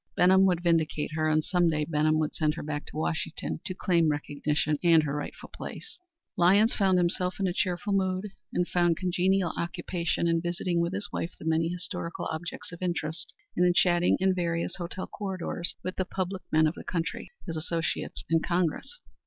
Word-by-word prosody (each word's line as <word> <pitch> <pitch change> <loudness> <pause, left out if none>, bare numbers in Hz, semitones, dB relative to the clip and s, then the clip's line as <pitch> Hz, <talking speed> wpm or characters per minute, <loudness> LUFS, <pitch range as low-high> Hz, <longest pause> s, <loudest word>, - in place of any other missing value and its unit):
Benham 190 +2 +6
would 175 -2 +1
vindicate 160 -3 +1
her, 155 0 +1
and 155 0 +3
some 175 -1 +2
day 150 -1 0
Benham 155 0 +2
would 155 -1 0
send 155 -1 +1
her - - -5
back 150 0 -4
to - - -8
Washington 160 0 -2
to 185 - -4
claim 170 -5 +2
recognition 150 0 0
and 165 -2 +6
her 145 -1 -2
rightful 145 - -6
place. 445 -5 -8 0.4
Lyons 200 +5 +5
himself 180 -2 +2
was - - -16
in 195 - +2
a 180 - -1
cheerful 190 +2 -1
mood 190 +1 0 0.2
and 180 - 0
found 175 -2 +2
congenial 185 0 +1
occupation 170 0 -1
in 165 0 +2
visiting 175 0 -1
with 170 +2 0
his 205 +1 -2
wife 170 - -3
the - - -10
many 160 +1 +2
historical 175 -1 -4
objects 170 +2 -5
of 170 - -10
interest, 170 -3 -2 0.2
and - - +3
in 180 -1 +4
chatting 175 0 +4
in 190 0 +3
various 170 -2 -1
hotel 180 +1 -4
corridors 185 -4 -3
with 185 - -4
the 185 - 0
public 185 0 -3
men 155 0 +5
of 155 - +2
the - - -9
country, 165 -2 -3 0.2
his 165 - -4
associates 165 +1 -2
in 165 0 +3
Congress. 180 - -1
175 Hz, 190 wpm, -28 LUFS, 160-185 Hz, 0.4 s, Benham